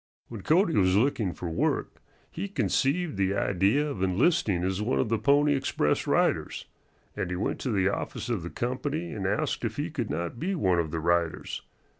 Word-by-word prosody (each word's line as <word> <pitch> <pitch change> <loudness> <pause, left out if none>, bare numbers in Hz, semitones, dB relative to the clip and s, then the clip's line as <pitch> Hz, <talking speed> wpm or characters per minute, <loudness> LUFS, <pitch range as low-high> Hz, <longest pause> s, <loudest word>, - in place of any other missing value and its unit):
When 115 -4 -7
Cody 165 - +3
was 95 -2 +3
looking 110 -4 +2
for 85 - -6
work 80 - -1 0.3
he 190 +5 -4
conceived 145 - 0
the 100 0 +1
idea 100 +9 +2
of 140 -11 -5
enlisting 100 - +2
as 95 +2 -1
one 115 +5 0
of 120 - +1
the 115 -1 +1
Pony 145 +1 +4
Express 130 - 0
riders, - - +1 0.5
and - - -2
he 90 - -2
went 90 - -2
to 130 - -3
the 95 -3 +2
office - - -4
of 115 -6 -1
the 85 - -6
company 140 - -3
and 95 -3 -3
asked 105 +4 -1
if 115 -2 -2
he 155 +3 -2
could 125 -8 -3
not 85 +7 -3
be 190 +4 -1
one 95 - +2
of 80 -2 -1
the 80 +1 -3
riders. 85 0 0
110 Hz, 195 wpm, -28 LUFS, 95-145 Hz, 0.5 s, Pony